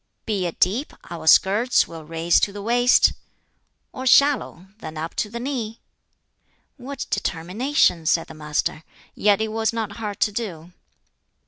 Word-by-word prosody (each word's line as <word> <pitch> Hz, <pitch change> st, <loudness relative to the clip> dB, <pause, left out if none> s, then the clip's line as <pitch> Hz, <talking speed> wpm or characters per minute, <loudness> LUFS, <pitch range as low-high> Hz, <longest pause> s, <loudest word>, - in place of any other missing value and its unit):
Be 200 Hz, -5 st, -1 dB
it 170 Hz, -, -8 dB
deep, 225 Hz, +11 st, +1 dB, 0.2 s
our 165 Hz, -2 st, -7 dB
skirts 210 Hz, +9 st, +4 dB
we'll 165 Hz, -2 st, -10 dB
raise 165 Hz, +2 st, +2 dB
to 200 Hz, -, 0 dB
the 200 Hz, 0 st, -8 dB
waist, 245 Hz, +2 st, +4 dB, 0.8 s
Or 260 Hz, 0 st, -5 dB
shallow, 275 Hz, -, +3 dB
then 155 Hz, -6 st, -8 dB
up 160 Hz, +2 st, -5 dB
to 210 Hz, -, -1 dB
the 235 Hz, -, -6 dB
knee,'" 235 Hz, -4 st, -4 dB, 1.0 s
"What 270 Hz, +1 st, -6 dB
determination!" 180 Hz, -, 0 dB
said 165 Hz, 0 st, +2 dB
the -, -, -12 dB
Master. 150 Hz, 0 st, -2 dB, 0.3 s
"Yet 205 Hz, 0 st, +2 dB
it 220 Hz, -, -1 dB
was 220 Hz, 0 st, 0 dB
not 220 Hz, -3 st, -4 dB
hard 210 Hz, -3 st, -5 dB
to 210 Hz, -, +3 dB
do." 180 Hz, -6 st, -6 dB
205 Hz, 150 wpm, -22 LUFS, 170-235 Hz, 1.0 s, skirts